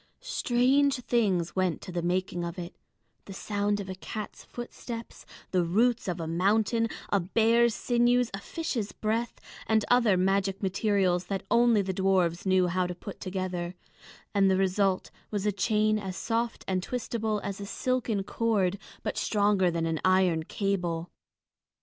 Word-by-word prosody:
Strange 275 - +2
things 195 -9 +1
went 185 -3 +1
to - - -9
the 175 -1 -2
making 175 0 -1
of 170 +1 -5
it, 175 0 -7 0.5
the 195 - -8
sound 205 0 -1
of 200 - -5
a 190 - -4
cat's 210 +3 -7
footsteps, 240 -1 -8 0.2
the 180 -2 +2
roots 225 +8 +2
of 180 -1 -2
a 165 - -3
mountain, 210 +7 +2 0.2
a 200 - +3
bear's 225 +5 +3
sinews, 245 0 +2
a 195 - -3
fish's 235 - -3
breath, 225 +2 -2 0.3
and 220 -1 +2
other 235 -6 +5
magic 195 +1 +1
materials 190 -2 +1
that 195 -1 -3
only 235 -3 +4
the 190 0 -2
dwarfs 185 -2 +1
knew 185 -1 +4
how 180 +1 0
to 180 - -5
put 200 +3 -9
together; 185 -2 -3 0.6
and 195 -2 +4
the 190 - +3
result 190 0 +1 0.2
was 205 -1 -2
a 210 - +3
chain 215 +1 +1
as 190 -2 -5
soft 230 0 -2
and 185 -1 0
twistable 220 -1 -2
as 200 0 -4
a - - -4
silken 240 -4 -1
cord, 200 -3 0 0.2
but - - -2
stronger 205 -3 +2
than 165 -1 -1
an 165 -1 -1
iron 185 -3 +3
cable. 175 -2 -2
195 Hz, 160 wpm, -28 LUFS, 185-225 Hz, 0.6 s, other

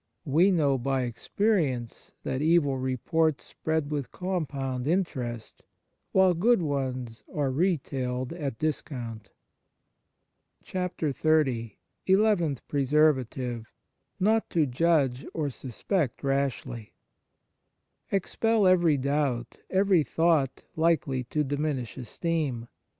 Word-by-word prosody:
We 165 +7 +4
know 145 -8 +2
by 135 +1 0
experience 130 - -1
that 130 - -2
evil 150 -4 +3
reports 130 +2 0
spread 160 -2 -2
with 145 -3 -3
com 180 -4 -2
pound 130 -2 -3
interest, 130 - -2 0.5
while 190 -1 +5
good 225 +7 +3
ones 130 -7 -3
are 145 -3 0
retailed 130 -5 -1
at 145 -9 -4
discount 120 -8 -4 1.4
70 180 -1 -3 0.2
XXX 135 -7 +1 0.3
ELEVENTH 190 - +2
PRESERVATIVE 130 -5 +1 0.5
Not 220 +3 +2
to 160 -3 +2
judge 135 -2 +1
or 150 -3 -1
suspect 135 - -2
rashly 135 -4 -2 1.2
EXPEL 215 +2 +1
every 175 -5 +4
doubt, 140 -3 -1
every 190 -2 +4
thought, 160 -5 +1
likely 140 -6 +1
to 150 +5 0
diminish 145 -4 -2
esteem. 135 -2 -2
145 Hz, 100 wpm, -27 LUFS, 130-170 Hz, 1.4 s, while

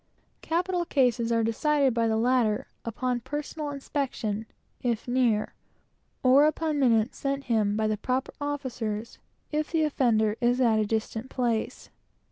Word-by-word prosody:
Capital 355 +2 0
cases 245 -7 +1
are 230 -1 +2
decided 275 +4 +2
by 230 -1 +1
him, 225 -1 +2 0.2
upon 245 +2 -2
personal 295 +4 -5
inspection, 260 -6 -3 0.3
if 235 -3 -1
he 245 - -5
is - - -1
near; 235 -5 +2 0.7
or 265 +3 +6
upon 310 -1 -1
minutes 230 -3 +2
sent 275 0 -2 0.3
by 220 - +1
the 215 0 0
proper 255 +5 -2
officers, 240 -7 -4 0.3
if 305 0 -1
the 325 -2 +2
offender 225 -7 +2
is 245 +1 +2
at 230 -4 +3
a 215 - +1
distant 220 +3 -2
place. 235 -3 -2
250 Hz, 140 wpm, -27 LUFS, 225-285 Hz, 0.7 s, or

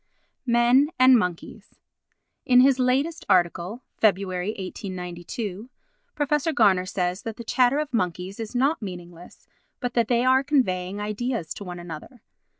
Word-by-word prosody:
Men 240 +4 +4
and 255 0 +7
Monkeys 180 -7 -3 0.7
In 250 0 +5
his 265 0 +4
latest 270 +7 0
article 185 +5 +1 0.2
(Feb. 210 -4 +5
1892) 185 +2 -5 0.5
Prof. 295 0 0
Garner 190 -6 +3
says 180 -1 -2
that 225 -1 -6
the 235 - -7
chatter 250 +3 +2
of 300 -2 -3
monkeys 185 -1 -2
is 225 +2 -6
not 275 +4 +1
meaningless, 175 -3 -10 0.3
but 245 -2 -3
that 235 -3 +1
they 240 +1 +1
are 260 +1 +4
conveying 200 -9 0
ideas 210 -3 -3
to - - -9
one 180 -2 -7
another. 175 - -10
220 Hz, 140 wpm, -24 LUFS, 180-255 Hz, 0.7 s, and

